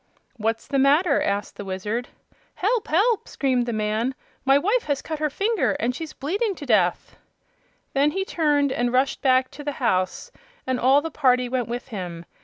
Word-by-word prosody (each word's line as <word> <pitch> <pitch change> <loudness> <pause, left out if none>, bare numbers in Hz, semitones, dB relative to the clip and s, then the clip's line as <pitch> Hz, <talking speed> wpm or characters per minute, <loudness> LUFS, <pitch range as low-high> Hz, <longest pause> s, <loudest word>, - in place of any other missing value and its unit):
"What's 225 +1 -1
the 275 -1 0
matter?" 285 +3 +4
asked 200 +1 -2
the - - -5
Wizard. 205 +5 -3 0.5
"Help! 440 +4 0
help!" 410 +8 +2
screamed 255 -3 0
the - - -1
man; 215 +4 -1 0.3
"my 270 +1 +6
wife 420 +11 +1
has 285 -2 0
cut 315 -2 -4
her 305 0 +1
finger 415 +8 0
off - - -4
and 240 +3 0
she's 320 +2 -6
bleeding 395 - -2
to 290 - -8
death!" 195 -8 +1 0.8
Then 280 +2 +3
he 385 +5 -2
turned 295 -6 +1
and 245 -1 0
rushed 260 +2 +1
back 255 -1 +3
to 295 - -9
the 290 0 -3
house, 230 - -1 0.3
and 260 -1 -1
all 270 +3 +5
the 325 - -4
party 250 -4 +2
went 245 -1 -1
with 245 +3 -5
him. 175 -6 -6
265 Hz, 190 wpm, -24 LUFS, 235-305 Hz, 0.8 s, my